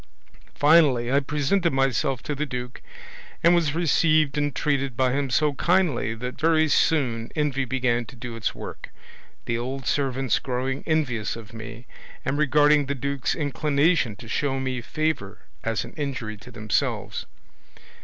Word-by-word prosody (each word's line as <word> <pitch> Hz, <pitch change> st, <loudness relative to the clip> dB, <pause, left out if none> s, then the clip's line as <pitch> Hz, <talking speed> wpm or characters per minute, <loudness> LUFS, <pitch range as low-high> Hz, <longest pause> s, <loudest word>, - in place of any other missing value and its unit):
Finally, 145 Hz, -6 st, +4 dB
I 140 Hz, -, +4 dB
presented 150 Hz, +5 st, 0 dB
myself 135 Hz, -1 st, +1 dB
to 150 Hz, -, -3 dB
the 150 Hz, +1 st, -2 dB
duke, 125 Hz, -1 st, -6 dB, 0.6 s
and 170 Hz, -, +6 dB
was 160 Hz, -4 st, +2 dB
received 155 Hz, -3 st, +3 dB
and 145 Hz, -1 st, -1 dB
treated 140 Hz, -4 st, -1 dB
by 130 Hz, -1 st, +2 dB
him 140 Hz, +1 st, -1 dB
so 150 Hz, +3 st, +2 dB
kindly 160 Hz, -, +1 dB
that 125 Hz, +3 st, -6 dB
very 160 Hz, 0 st, +4 dB
soon 125 Hz, -7 st, +1 dB
envy 145 Hz, -3 st, 0 dB
began 120 Hz, -2 st, 0 dB
to -, -, -13 dB
do 120 Hz, 0 st, -7 dB
its 115 Hz, -, -2 dB
work, -, -, -8 dB, 0.6 s
the 115 Hz, 0 st, -1 dB
old 130 Hz, +2 st, -4 dB
servants 135 Hz, 0 st, 0 dB
growing 130 Hz, +1 st, -3 dB
envious 130 Hz, -9 st, 0 dB
of 115 Hz, -2 st, -11 dB
me, 115 Hz, +2 st, -9 dB, 0.4 s
and 130 Hz, -, 0 dB
regarding 150 Hz, 0 st, +4 dB
the 140 Hz, -, -1 dB
duke's 140 Hz, 0 st, -2 dB
inclination 145 Hz, -, +1 dB
to 115 Hz, -, -12 dB
show 135 Hz, +3 st, -1 dB
me 130 Hz, -2 st, -2 dB
favour 115 Hz, -8 st, -2 dB, 0.2 s
as 115 Hz, -1 st, -1 dB
an -, -, -12 dB
injury 130 Hz, -8 st, -4 dB
to 105 Hz, -, -14 dB
themselves. 110 Hz, -4 st, -2 dB
135 Hz, 155 wpm, -25 LUFS, 120-150 Hz, 0.6 s, and